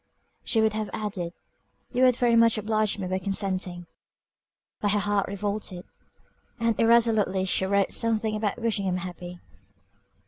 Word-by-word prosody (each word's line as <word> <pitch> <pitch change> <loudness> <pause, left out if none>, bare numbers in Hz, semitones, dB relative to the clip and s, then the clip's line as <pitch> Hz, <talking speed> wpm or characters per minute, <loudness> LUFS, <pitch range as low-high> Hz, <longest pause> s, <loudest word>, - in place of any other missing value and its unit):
She 225 - +2
would 220 -1 +2
have 215 -1 -3
added, 200 -5 -4 0.6
"you 250 - -1
would 255 -2 +5
very 240 -1 +2
much 230 -1 +4
oblige 215 0 0
me 195 - -4
by 185 +1 -1
consenting;" 185 -2 -2 0.9
but 205 -1 +1
her 205 - +2
heart 205 -1 0
revolted 200 -2 -4 0.7
and 230 -1 +1
irresolutely 225 -5 +3
she 190 0 +1
wrote 200 0 +1
something 220 -2 +1
about 210 -2 -2
wishing 225 -4 -1
him 185 -1 0
happy. 180 0 -8
205 Hz, 145 wpm, -26 LUFS, 190-220 Hz, 0.9 s, would